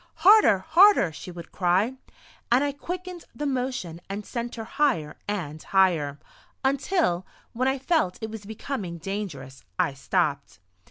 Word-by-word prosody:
"Harder! 415 - +8
Harder!" 340 - +5
she 155 - -9
would 170 -1 -10
cry, 185 +7 +2 0.6
and 250 +4 +5
I 290 - 0
quickened 360 +4 -6
the 295 - -3
motion 250 - -2
and 200 +1 -5
sent 240 -1 -4
her 225 - -5
higher 220 - 0
and 160 -7 -4
higher, 170 -7 +2 0.5
until, 275 - +1 0.3
when 255 +2 0
I 265 +1 +1
felt 270 - +1
it 220 0 -5
was 220 -2 -7
becoming 210 -4 -5
dangerous, 165 -8 -6
I 140 - +1
stopped. 140 0 -1
210 Hz, 145 wpm, -26 LUFS, 170-275 Hz, 0.6 s, Harder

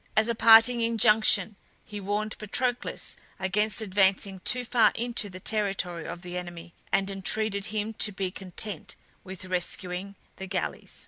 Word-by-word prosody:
As 215 +1 +4
a 235 - +1
parting 230 +1 +7
injunction 215 -3 +3 0.3
he 210 -1 -8
warned 205 +2 -2
Patroclus 245 +4 -2 0.2
against 210 +4 0
advancing 195 -1 +1
too 245 +6 0
far 240 -1 +4
into 235 -3 -1
the 185 0 -10
territory 195 -5 -2
of 175 +1 -8
the 180 0 -5
enemy, 175 -1 -9 0.2
and 195 +1 +1
entreated 200 +1 0
him 215 +1 -3
to 210 - +2
be 190 -2 -3
content 195 +2 -4 0.3
with 190 -1 -9
rescuing 180 +1 -3 0.2
the 190 - -7
galleys. 190 -1 -4
200 Hz, 145 wpm, -27 LUFS, 185-220 Hz, 0.3 s, parting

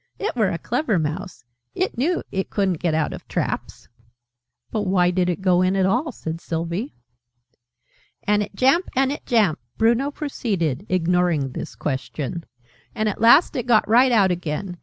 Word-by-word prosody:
"It 415 - -3
were 215 -5 +2
a 170 - -2
clever 240 - -1
mouse. 165 +3 -4 0.3
It - - -1
knew 330 +9 0
it 190 0 -2
couldn't 190 -5 0
get 170 -3 0
out 160 -1 0
of - - -10
traps!" - - -4 0.8
"But 210 -2 -2
why 180 -1 +3
did 180 0 +1
it 180 +2 -2
go 180 -1 +4
in 185 +1 +2
at 190 -1 +2
all?" 245 - +1
said 165 -7 -6
Sylvie. 170 - -4 0.7
" 120 0 -40
and 210 0 +3
it 205 -1 -5
jamp, 270 - +3
and 265 +1 +2
it 290 - -7
jamp," 215 - +2 0.2
Bruno 235 +5 +2
proceeded, 205 - -3
ignoring 175 -5 +1
this - - -7
question, 150 +4 -4 0.5
"and 215 -1 0
at 205 - -5
last 235 +9 +6
it 250 -1 -3
got 225 -3 +4
right 250 +4 +5
out 200 -5 +4
again. 175 +1 -4
190 Hz, 175 wpm, -22 LUFS, 170-235 Hz, 0.8 s, last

